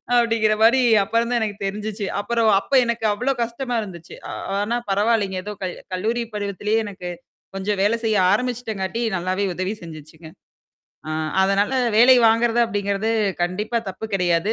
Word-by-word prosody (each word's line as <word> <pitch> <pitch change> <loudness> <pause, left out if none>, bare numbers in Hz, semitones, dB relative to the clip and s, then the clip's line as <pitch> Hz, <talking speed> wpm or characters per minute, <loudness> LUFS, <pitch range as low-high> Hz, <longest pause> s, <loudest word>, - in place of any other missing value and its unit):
அப்படிங்கிற 225 -2 +3
மாரி 240 +4 +5 0.2
அப்பறம்தான் 235 +3 0
எனக்கு 210 -2 -2
தெரிஞ்சுச்சு. 210 +1 -4
அப்புறம் 225 +2 +1
அப்ப 280 - -16
எனக்கு 235 -1 -2
அவ்வளோ 250 +6 0
கஷ்டமா 240 +2 -4
இருந்துச்சு. 170 -5 -9
அ - - -5 0.3
ஆனா 225 +3 -1
பரவாயில்லங்க! 205 -1 +1
ஏதோ 210 - -5
கல் 180 - -3 0.2
கல்லூரி 230 +6 -1
பருவத்திலேயே 205 +2 -1
எனக்கு, 185 -3 -7 0.5
கொஞ்சம் 195 +1 -2
வேலை 225 +3 +2
செய்ய 220 -2 +2 0.2
ஆரம்பிச்சுட்டங்காட்டி 225 -3 -2 0.2
நல்லாவே 185 +3 -1
உதவி 185 +4 -2
செஞ்சுச்சுங்க. 160 0 -11 0.8
ஆ - - -3 0.3
அதனால 195 +4 +2 0.2
வேலை 250 +3 +7
வாங்குறது 230 +1 +2
அப்படிங்கிறது 205 0 -1 0.3
கண்டிப்பா 210 +6 -1
தப்பு 220 +3 -6
கிடையாது. 180 +2 +1
210 Hz, 140 wpm, -22 LUFS, 195-230 Hz, 0.8 s, வேலை